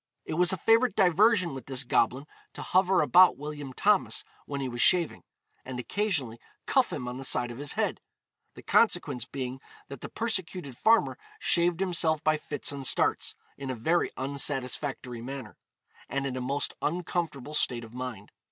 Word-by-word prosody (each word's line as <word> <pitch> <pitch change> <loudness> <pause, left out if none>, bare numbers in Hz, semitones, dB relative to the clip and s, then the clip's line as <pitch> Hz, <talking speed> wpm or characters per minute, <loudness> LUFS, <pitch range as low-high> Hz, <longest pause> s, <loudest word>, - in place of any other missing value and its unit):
It - - -4
was 175 +3 +3
a 190 - -2
favourite 225 +1 +3
diversion 190 -1 +4
with 135 -3 -8
this 135 -1 0
goblin 130 +2 +1 0.3
to - - -7
hover 185 0 +3
about 180 +4 +6
William 145 -1 -6
Thomas 200 +9 +1 0.2
when 140 -1 -4
he 135 - -2
was 120 -1 -3
shaving, 175 -3 +3 0.4
and 125 -1 -6
occasionally 140 - -1 0.3
cuff - - +2
him 125 - -4
on 125 +1 -5
the - - -6
side 120 -2 +1
of 120 - -9
his 145 0 -1
head 220 0 -1 0.5
the - - -12
consequence 145 - +2
being 130 0 -5 0.3
that 140 -3 -9
the - - -7
persecuted 185 - -3
farmer 225 - +3 0.2
shaved 175 - +2
himself 165 -4 +1
by 155 0 +3
fits 145 -2 -3
and 140 -2 -3
starts, - - +2 0.2
in 135 -1 -5
a 130 - -2
very 165 +10 +1
unsatisfactory 135 -2 -2
manner, 130 -2 -7 0.5
and 140 0 -2
in 135 -2 -3
a 130 - -3
most 140 +3 -2
uncomfortable 160 -4 -3
state 120 -5 0
of 115 0 -12
mind. 125 -5 -7
145 Hz, 170 wpm, -28 LUFS, 130-180 Hz, 0.5 s, about